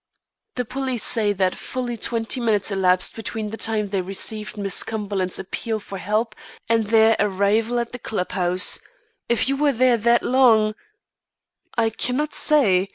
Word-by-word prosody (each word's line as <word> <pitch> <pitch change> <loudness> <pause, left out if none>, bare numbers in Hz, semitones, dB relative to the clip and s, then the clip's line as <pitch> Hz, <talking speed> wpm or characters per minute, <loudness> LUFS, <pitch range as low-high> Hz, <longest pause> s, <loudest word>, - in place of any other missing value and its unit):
"The 250 - -2
police 260 -1 -2
say 215 -3 +1
that 185 -1 0
fully 250 -2 -5
twenty 230 +1 -1
minutes 220 -4 0
elapsed 185 -1 +2
between 220 -1 -5
the - - -4
time 220 -2 -1
they 195 -1 -1
received 210 +3 -4
Miss 200 -2 +2
Cumberland's 200 -4 -2
appeal 220 +4 -4
for 200 -2 -8
help 215 +3 -1 0.3
and 225 -2 +1
their 225 0 +5
arrival 210 +4 +1
at 235 -1 -3
the 245 - -8
club 210 -5 -4
house. 180 0 +3 0.5
If 235 +1 +2
you 275 - +1
were 290 +1 +2
there 250 0 +3
that 235 +2 +3
long 230 -5 +4 0.5
" - - -33
"I 225 -1 +2
cannot 255 +7 -2
say. 200 - +3
220 Hz, 160 wpm, -22 LUFS, 200-235 Hz, 0.5 s, their